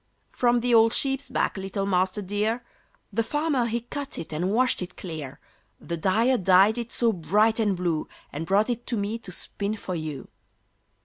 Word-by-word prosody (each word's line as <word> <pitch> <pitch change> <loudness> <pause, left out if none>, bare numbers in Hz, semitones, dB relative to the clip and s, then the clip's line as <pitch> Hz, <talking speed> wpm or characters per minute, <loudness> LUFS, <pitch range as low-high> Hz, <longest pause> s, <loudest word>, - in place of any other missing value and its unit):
"From 240 -1 +2
the 245 0 +1
old 225 0 +6
sheep's 270 0 0
back, - - 0
little 195 +1 -3
Master 190 +1 +1
dear! 210 +5 -1 0.5
The 230 - +2
farmer 290 0 0
he 235 +1 -1
cut 280 +4 -6
it 160 - -6
and 175 +5 -1
washed 250 +1 +2
it 180 0 -7
clear; 155 -6 -7 0.4
The 170 - -4
dyer 225 +9 +2
dyed 195 +5 +5
it 235 -1 -5
so 230 -2 +2
bright 210 +6 +2
and 205 -4 +1
blue, 170 -3 -1 0.3
And 155 +3 -4
brought 205 +5 +3
it 240 0 -5
to 235 - 0
me 210 +3 -2
to 195 - -9
spin 200 +4 -3
for 185 - -5
you." 155 -5 -5
210 Hz, 185 wpm, -26 LUFS, 185-235 Hz, 0.5 s, old